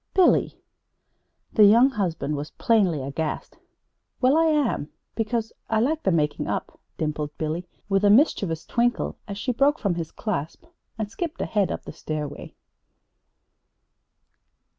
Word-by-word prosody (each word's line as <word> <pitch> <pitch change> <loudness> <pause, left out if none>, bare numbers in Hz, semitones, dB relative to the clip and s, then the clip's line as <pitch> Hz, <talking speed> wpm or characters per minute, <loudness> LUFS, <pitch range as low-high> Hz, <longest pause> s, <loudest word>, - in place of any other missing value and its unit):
"Billy!" 370 -2 +3 0.9
The 215 - +7
young 235 +6 +6
husband 175 - -2
was 145 +1 -5
plainly 190 - +2
aghast. 150 +3 -4 0.6
"Well, 260 +3 +4
I 325 +1 +4
am 290 - +1 0.2
because 225 0 -2 0.2
I 220 - +2
like 305 +7 +1
the 190 - +1
making 150 -3 0
up," - - -4 0.2
dimpled 150 -1 -3
Billy, 160 +3 -3 0.2
with 195 0 +1
a 205 - +6
mischievous 200 - +3
twinkle 240 0 0
as 200 -1 -5
she 210 +5 -1
broke 280 +5 +3
from 200 - 0
his 165 -2 -4
clasp 180 - -4 0.3
and 215 -2 -3
skipped 335 +6 -4
ahead 205 -3 0
up - - -4
the - - -8
stairway. 150 -2 -6
205 Hz, 140 wpm, -25 LUFS, 160-240 Hz, 0.9 s, The